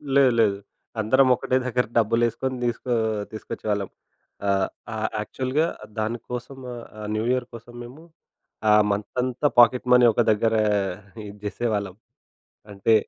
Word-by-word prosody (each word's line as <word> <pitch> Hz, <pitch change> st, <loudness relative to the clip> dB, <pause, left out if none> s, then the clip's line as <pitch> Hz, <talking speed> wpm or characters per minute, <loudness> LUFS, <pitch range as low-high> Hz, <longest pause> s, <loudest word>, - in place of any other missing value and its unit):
లేదు 135 Hz, -2 st, +6 dB
లేదు. 100 Hz, -3 st, +3 dB, 0.4 s
అందరం 130 Hz, +5 st, +4 dB
ఒకటే 130 Hz, -, 0 dB
దగ్గర 125 Hz, -1 st, +1 dB
డబ్బులేసుకొని 120 Hz, +3 st, +1 dB
తీసుకో 120 Hz, +1 st, -1 dB, 0.4 s
తీసుకొచ్చేవాళ్ళం. 105 Hz, -2 st, -3 dB, 0.6 s
ఆహ్, 95 Hz, -1 st, +2 dB, 0.3 s
ఆహ్, 110 Hz, 0 st, -1 dB
యాక్చువల్‌గా 130 Hz, +8 st, -1 dB, 0.3 s
దానికోసం 120 Hz, +4 st, -4 dB, 0.4 s
ఆహ్, 105 Hz, -, -5 dB
న్యూ 110 Hz, -, -1 dB
ఇయర్ 125 Hz, -1 st, 0 dB
కోసం 115 Hz, +1 st, -11 dB
మేము 130 Hz, +7 st, -12 dB, 0.7 s
ఆ -, -, +7 dB, 0.2 s
మంతంతా 125 Hz, +7 st, -1 dB
పాకెట్ 125 Hz, +1 st, +5 dB
మనీ 125 Hz, 0 st, +7 dB
ఒక 120 Hz, -, +2 dB
దగ్గర 110 Hz, +2 st, +1 dB, 0.7 s
ఇది 100 Hz, +1 st, -11 dB
చేసేవాళ్ళం. 105 Hz, -4 st, -2 dB, 0.8 s
అంటే 100 Hz, +3 st, +2 dB
115 Hz, 120 wpm, -24 LUFS, 105-125 Hz, 0.8 s, ఆ